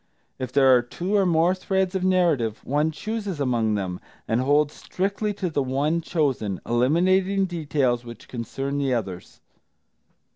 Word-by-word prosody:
If 130 -2 -4
there 135 -1 +6
are 125 - +4
two 175 +11 -3
or 195 -2 +3
more 170 +1 +3
threads 190 0 -1
of 190 -1 -1
narrative, 170 - +1
one 150 +3 +1
chooses 205 +1 -4
among 120 -5 +1
them, 95 -3 -3 0.3
and 115 +2 +1
holds 145 +2 +2
strictly 200 +3 -2
to 190 -2 -2
the 155 -4 -1
one 140 +5 0
chosen, 135 - -1
eliminating 185 +10 +2
details 145 -8 0
which 120 -2 -11
concern 135 +4 -4
the 135 -3 +1
others. 95 -6 -6
145 Hz, 150 wpm, -24 LUFS, 125-185 Hz, 0.3 s, there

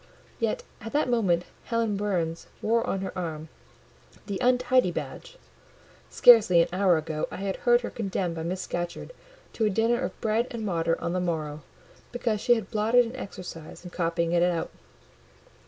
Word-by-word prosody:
Yet - - -1 0.2
at 225 - -7
that 290 -3 +1
moment 185 -8 +2 0.2
Helen 230 -3 0
Burns 180 -5 -2 0.2
wore 230 +1 +2
on 195 - -1
her 195 - -5
arm 160 -3 -5 0.8
"the 200 -2 -4
untidy 250 -3 +3
badge;" - - -6 0.7
scarcely 220 -8 +7
an 170 - +4
hour 185 -2 +4
ago 155 -1 -3
I - - -7
had 195 0 -3
heard 240 0 +3
her - - -5
condemned 190 -5 -2
by 165 - -5
Miss 180 +3 -3
Scatcherd 175 - -5 0.4
to 225 - 0
a - - +3
dinner 225 +4 +1
of - - -4
bread 225 +2 +1
and 230 -2 -5
water 165 -3 0
on 170 - -2
the 185 - 0
morrow 155 -4 -3 0.5
because 230 -4 -1
she 240 - +5
had 220 -4 -5
blotted 225 +3 +3
an 230 +2 -7
exercise 180 -10 -8
in 180 - -9
copying 170 -1 -1
it 170 0 +3
out. 175 -2 0
195 Hz, 170 wpm, -27 LUFS, 170-230 Hz, 0.8 s, scarcely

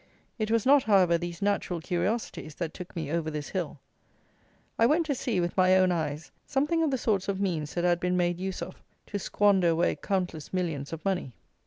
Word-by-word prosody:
It 215 0 -1
was 225 -1 +2
not, 280 +1 +6
however, 190 -5 +5
these 170 +2 -4
natural 200 -3 0
curiosities 175 -2 -2
that 165 -3 -4
took 180 0 -9
me 160 -4 -3
over 165 -1 -1
this 150 -2 -5
hill; 175 -6 -3 1.0
I 230 - +6
went 320 +5 +3
to 295 - 0
see, 240 -6 -1
with 175 0 -1
my 185 0 +5
own 185 -1 +4
eyes, 160 -2 -3
something 295 +5 +1
of 320 - +2
the 265 - 0
sorts 205 -6 0
of 195 -1 -1
means 165 -7 -2
that 175 - 0
had 175 -1 +3
been 180 0 0
made 175 -1 +1
use 190 0 -3
of - - -10 0.2
to 205 - -4
squander 200 -2 +3
away 170 +1 +2
countless 180 -6 -3
millions 165 -7 -2
of 165 +2 -7
money. 185 -10 -1
180 Hz, 205 wpm, -28 LUFS, 170-205 Hz, 1.0 s, not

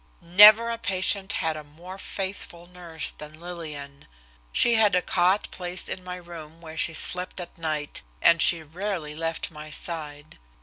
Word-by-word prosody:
Never 210 +6 +7
patient 195 -2 0
had 160 -1 0
a 155 - -7
more 175 +6 -12
faithful 190 -4 -6
nurse 175 -3 -3
than 150 +1 -11
Lillian. 155 -5 -8 0.4
She 240 - +5
had 215 -4 +4
a 180 - +3
cot 185 +3 +2
placed 180 0 -1
in 185 - -5
my 180 0 -6
room 165 -3 -11
where 160 -2 -10
she 165 0 0
slept 180 +3 -1
at 175 - -8
night, 155 -3 -4 0.2
and 170 - +5
she 165 -1 +4
rarely 170 -1 -4
left 165 +1 -3
my 155 -1 -10
side. 155 - -6
170 Hz, 160 wpm, -25 LUFS, 155-185 Hz, 0.4 s, Never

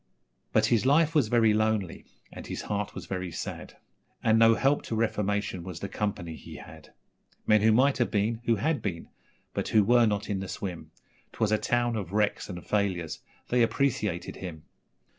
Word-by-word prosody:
But - - +3
his 115 - +3
life 155 +4 +4
was 145 -8 +3
very 115 -1 +4
lonely, 110 -4 0 0.3
and - - -9
his - - -5
heart 105 0 -3
was - - -7
very 90 -2 -4
sad, - - -7 0.5
And 110 0 +4
no 115 0 +6
help 135 +4 +2
to 115 - -2
reformation 105 -4 -1
was 90 -2 -7
the 100 - -4
company 95 -5 -3
he - - -11
had 80 -1 -12 0.5
Men 110 -1 +4
who 110 +1 +5
might 130 +5 +3
have 120 - +2
been, 110 +3 0
who 115 - +3
had 150 +8 0
been, 85 -5 -4 0.4
but - - -2
who 110 - +4
were 120 +2 +5
not 105 -1 -1
in 100 -2 -2
the 95 - -5
swim 90 -3 -6 0.4
'Twas 110 -2 0
a 110 - +3
town 120 -1 0
of 100 -4 -5
wrecks 105 0 0
and 90 -2 -7
failures 95 -6 -1 0.3
they 125 0 +3
appreciated 110 -8 0
him. 85 -5 -7
105 Hz, 185 wpm, -28 LUFS, 95-115 Hz, 0.5 s, no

